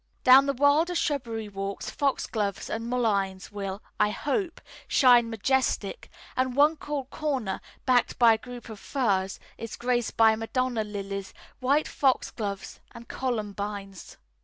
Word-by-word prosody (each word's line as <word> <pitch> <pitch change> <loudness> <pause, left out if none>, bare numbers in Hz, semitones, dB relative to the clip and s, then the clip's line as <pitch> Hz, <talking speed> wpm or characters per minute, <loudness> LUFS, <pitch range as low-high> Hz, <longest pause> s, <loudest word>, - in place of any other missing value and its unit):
Down 265 +2 +8
the 280 - +1
wilder 290 +6 +3
shrubbery 235 -9 -1
walks 195 0 -5
foxgloves 220 -8 -1
and 230 +1 -3
mulleins 200 -7 0
will 200 -1 -5 0.2
(I 210 - +4
hope) 325 - -2 0.3
shine 245 -3 +5
majestic; 230 -2 -1 0.3
and 255 -1 0
one 295 +3 +5
cool 290 -3 -4
corner, 265 -8 -3 0.2
backed 250 -2 +2
by 235 -2 +7
a - - 0
group 245 +1 -10
of 215 -2 -8
firs, 195 -9 -1 0.2
is 230 -1 -6
graced 240 -1 -1
by 220 -1 +6
Madonna 235 +1 -1
lilies, 200 -2 -6 0.2
white 280 +4 +2
foxgloves, 215 -7 -1 0.2
and 235 0 -11
columbines. 205 -5 -4
235 Hz, 135 wpm, -27 LUFS, 205-265 Hz, 0.3 s, Down